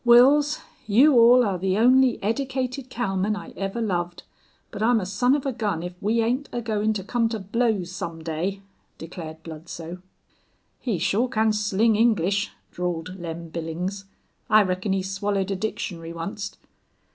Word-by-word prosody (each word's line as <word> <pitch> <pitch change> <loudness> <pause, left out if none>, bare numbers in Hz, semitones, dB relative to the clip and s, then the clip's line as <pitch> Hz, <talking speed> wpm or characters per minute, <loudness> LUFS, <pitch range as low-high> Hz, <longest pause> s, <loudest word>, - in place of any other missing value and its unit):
"Wils, 275 +5 +6 0.3
you 260 +9 +6
all 245 +1 +7
air 190 -3 -1
the 190 +1 0
only 255 +2 +5
eddicated 260 +3 -2
cowman 205 -4 -1
I 205 - -8
ever 195 +4 -4
loved, 175 -5 -2 0.5
but - - -6
I'm 230 +1 +4
a 190 - -3
son 245 +8 +2
of 285 - -3
a 270 - -1
gun 205 -8 -2
if 180 0 -5
we 225 +3 +2
ain't 255 +5 -1
agoin' 220 -2 0
to 195 -3 -4
come 230 +3 0
to 225 - -2
blows 205 -2 0
some 170 -3 -6
day," 175 +5 -3 0.3
declared 160 -1 -8
Bludsoe. 165 +2 -8 0.8
"He 230 -7 -1
shore 205 +8 +1
can 220 -3 +2
sling 210 +1 +2
English," 205 -2 +2 0.2
drawled 180 +1 -4
Lem 170 -1 -6
Billings. 175 +5 -4 0.4
"I 215 0 +7
reckon 185 +1 -1
he 190 -1 0
swallowed 195 0 -1
a - - 0
dictionary 185 -5 -4
onct." 200 +5 -5
205 Hz, 160 wpm, -24 LUFS, 180-235 Hz, 0.8 s, all